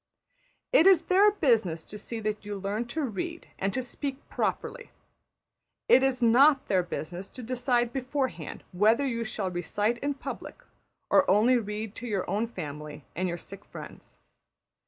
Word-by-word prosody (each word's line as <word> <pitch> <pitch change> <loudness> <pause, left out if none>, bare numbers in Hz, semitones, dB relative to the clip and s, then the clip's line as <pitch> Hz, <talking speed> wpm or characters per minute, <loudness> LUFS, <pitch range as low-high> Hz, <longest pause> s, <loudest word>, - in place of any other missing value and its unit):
It 370 -7 +7
is 380 -4 +6
their 390 +3 +5
business 225 - +1
to - - -10
see 225 +2 -6
that 215 0 -2
you 205 -1 -5
learn 200 +4 -2
to 310 +6 -2
read 335 - -4
and 195 +1 0
to 260 - 0
speak 270 +2 -5
properly; - - -2 1.0
it 260 - +7
is 260 -2 +1
not 270 +5 +6
their 185 -2 +2
business 175 +2 -6
to 255 - -9
decide 245 0 0
beforehand 260 - -3
whether 220 +9 +3
you 235 -3 -1
shall 210 -4 -3
recite 205 +7 -1
in 285 +2 -1
public - - -7 0.5
or 285 - +5
only 230 +6 +5
read 210 -1 -5
to 245 - -6
your 200 -4 -1
own 210 +5 0
family 150 - -7
and 185 +2 0
your 175 -1 -3
sick - - -10
friends. - - -11
230 Hz, 160 wpm, -28 LUFS, 195-265 Hz, 1.0 s, It